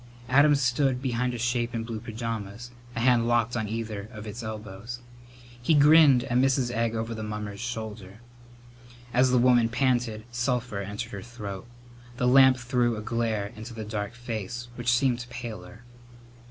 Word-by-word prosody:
Adam 145 +3 +6
stood 130 0 +1
behind 125 -1 -1
a - - -4
shape 120 0 -1
in 115 - -2
blue 115 -1 -5
pajamas, 115 0 -5 0.2
a - - -2
hand 120 -1 +4
locked 120 0 +2
on 110 -2 -1
either 110 -2 -4
of 110 -3 -9
its 110 +3 -6
elbows. 110 +1 -7 0.6
He 155 +6 +3
grinned 145 -3 +7
at 120 +1 +1
Mrs. 130 -2 +2
Egg 115 -1 0
over 115 +1 -3
the 110 - -6
mummer's 105 -1 -5
shoulder. 110 -4 -6 1.0
As 125 +1 +4
the 125 - +3
woman 120 -2 +4
panted 120 -3 0
sulphur 120 -3 -1
entered 105 +4 -5
her - - -6
throat. 105 -4 -7 0.5
The 125 -1 +1
lamp 130 0 +7
threw 120 -2 0
a - - -4
glare 110 -3 -1
into 110 +2 -9
the 110 -1 -5
dark 105 +1 -4
face, 120 0 -5
which 120 0 0
seemed 125 -1 +2
paler. 115 -3 -8
120 Hz, 165 wpm, -27 LUFS, 110-125 Hz, 1.0 s, grinned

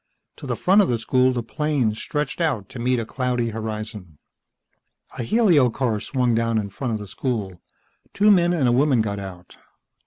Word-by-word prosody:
To - - -9
the - - -1
front 195 +3 +4
of 200 - +1
the 120 - +1
school 130 +3 +2
the 120 -2 -2
plains 135 -7 -1
stretched 150 +2 -3
out 125 - -1
to 125 - -9
meet 125 +1 +1
a 115 - -3
cloudy 125 -1 -1
horizon. 105 -6 -6 1.0
A - - 0
helio 165 - +3
car 115 -3 -1
swung 125 +1 0
down 115 0 +1
in 100 -2 -2
front 125 +2 -3
of - - -4
the 105 - -8
school. 100 -6 -4 0.5
Two 210 +1 +4
men 175 -3 +4
and 155 -7 +1
a - - +3
woman 130 -1 +3
got 100 -2 -3
out. 90 -3 -10
120 Hz, 190 wpm, -23 LUFS, 110-140 Hz, 1.0 s, front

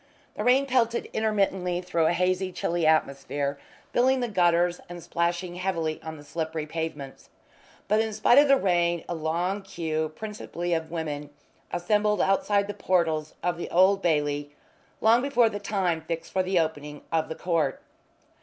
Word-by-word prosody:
The 210 - -4
rain 255 +4 +4
pelted 240 -3 0
intermittently 195 -5 0
through 175 -3 0
a - - +2
hazy, 185 +1 0
chilly 170 -2 -1
atmosphere, 140 -2 0 0.3
filling 260 +2 +3
the 245 - -1
gutters 175 -3 +2
and 175 -1 -8
splashing 175 +1 -1
heavily 170 -4 -2
on 160 0 -7
the 145 - -12
slippery 160 0 -4
pavements. 155 -3 -6 0.6
But 215 +2 +3
in 220 0 -2
spite 215 +5 +5
of 290 - +5
the 275 0 +6
rain 175 -5 +1
a - - -3
long 170 +5 -1
queue, 160 -5 -3
principally 175 -5 -4
of 160 -1 -2
women, 150 -3 -4 0.4
assembled 210 +3 +1
outside 200 +2 +2
the 205 - -5
portals 165 -6 0
of 175 -1 -1
the - - -5
Old 190 +3 +4
Bailey 145 -3 0 0.5
long 230 +2 +5
before 250 -4 +3
the 205 -2 -5
time 190 -5 -1
fixed 165 +1 -5
for 190 - +2
the 185 0 0
opening 150 -2 -3
of 160 -1 0
the 160 - -4
court. 160 -5 0
175 Hz, 165 wpm, -26 LUFS, 160-200 Hz, 0.6 s, the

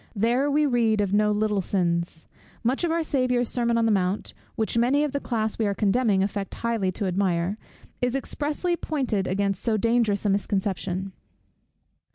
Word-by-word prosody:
There 240 +7 +2
we 300 +1 +3
read 235 -5 +2
of 200 -1 0
no 210 0 +3
little 210 -1 +1
sins. 170 -3 -1 0.4
Much 255 +7 +1
of 345 - +1
our 330 0 +1
Saviour's 250 -5 0
sermon 235 -1 +1
on 230 - +2
the 225 - +3
mount, 190 0 0 0.2
which 220 -1 -1
many 255 +5 +3
of 300 - -1
the 280 - -1
class 220 -5 -2
we 220 - +2
are 200 - -1
condemning 205 -2 +2
affect 200 -1 -3
highly 230 -5 -1
to 200 - -3
admire, 185 +1 0 0.4
is 245 +1 0
expressly 300 +5 -2
pointed 255 - -1
against 195 0 -1
so 225 -2 +1
dangerous 225 -2 +1
a - - +3
misconception. 195 -1 -2
215 Hz, 175 wpm, -25 LUFS, 195-245 Hz, 0.4 s, we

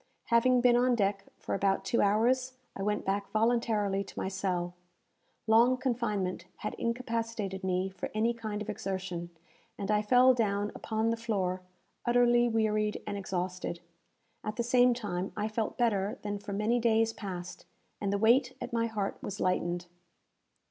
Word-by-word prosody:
Having 245 +2 +5
been 245 -1 +5
on 245 0 +3
deck 200 -2 0
for - - -5
about 195 0 +1
two 235 - +2
hours, 245 +6 +2 0.2
I - - -5
went 210 +1 -1
back 200 +1 -1
voluntarily 215 -3 +1
to - - -13
my - - -1
cell. 180 -2 -2 0.7
Long 235 +3 +5
confinement 215 -9 -1 0.2
had - - -2
incapacitated 230 -5 -2
me 185 0 0
for 190 - -5
any 225 +2 +2
kind 215 -2 -4
of - - -9
exertion, 185 -3 -4 0.5
and 200 +1 -2
I 210 0 +3
fell 250 +4 +6
down 205 -3 0
upon 220 +1 -1
the 230 - -1
floor, 195 -5 -1 0.4
utterly 240 0 +4
wearied 215 -2 +1
and 205 - -3
exhausted. 180 -3 -3 0.6
At 215 - -3
the 235 - -1
same 245 +1 +4
time, 195 -5 -3
I 210 0 0
felt 220 0 -2
better 205 -4 +1
than 205 -1 -3
for 205 - -8
many 215 +4 +1
days 225 -1 +2
past, 180 -4 -7 0.3
and 200 -1 0
the 200 - +1
weight 235 +5 +3
at - - -6
my 230 0 +1
heart 210 -3 -3
was 200 - -5
lightened. 175 -1 0
215 Hz, 160 wpm, -30 LUFS, 195-235 Hz, 0.7 s, fell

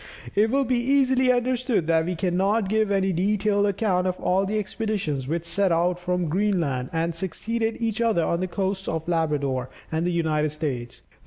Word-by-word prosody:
It 215 +2 +3
will 275 +3 +2
be 250 0 +1
easily 260 0 +3
understood 245 - 0
that 160 0 +2
we 180 +1 -2
cannot 190 +4 +1
give 215 0 +2
any 195 -1 +1
detailed 205 +3 +1
account 190 -3 +1
of 185 0 -2
all 190 +2 +1
the 215 +2 -1
expeditions, 195 - -2
which 165 +3 -2
set 195 +2 +1
out 175 +2 +1
from 180 -1 -1
Greenland, 160 -8 0
and 165 +1 -1
succeeded 225 +7 -2
each 230 -1 -1
other 220 -8 +2
on 170 - 0
the 185 - -1
coasts 190 +1 -2
of 160 0 -3
Labrador 145 -6 0 0.2
and 160 +1 0
the 175 - 0
United 155 -3 +1
States. 135 -6 -5
185 Hz, 180 wpm, -24 LUFS, 165-215 Hz, 0.2 s, It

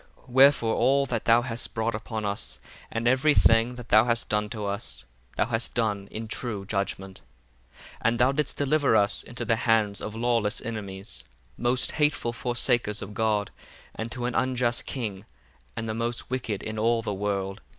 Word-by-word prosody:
8 - - -21
Wherefore 130 -3 +5
all 135 +3 +3
that 115 -4 -3
thou 120 +1 +5
hast 120 -1 -3
brought 110 +1 0
upon 110 0 -4
us, 100 +1 -3 0.3
and 115 +1 -2
every 135 +4 +4
thing 115 +2 +4
that 120 -2 -10
thou 110 +2 +6
hast 115 -1 0
done 105 0 0
to 105 -2 -4
us, 100 - -4 0.3
thou - - +2
hast 115 0 -1
done 105 -4 0
in 110 +1 -6
true 110 -3 -3
judgment. 95 -1 -3 0.5
9 - - -32 0.3
And 115 +1 +2
thou 125 +2 +5
didst 145 0 -2
deliver 145 -3 +2
us 100 -1 +3
into 120 0 -6
the 115 0 +2
hands 110 -3 +2
of 105 - -5
lawless 115 -2 +1
enemies, 100 - -6 0.3
most 125 +1 +1
hateful 145 -6 +1
forsakers 120 -3 +1
of 105 +1 -8
God, 105 -1 0 0.4
and 110 +1 -5
to 120 0 -4
an 125 - -1
unjust 125 -2 0
king, 105 -7 -4 0.5
and 115 - -4
the 110 - -2
most 115 +2 -3
wicked 115 -6 -2
in 110 0 -4
all 115 +1 +2
the 105 - -2
world. 100 -1 -2
115 Hz, 180 wpm, -26 LUFS, 105-120 Hz, 0.5 s, thou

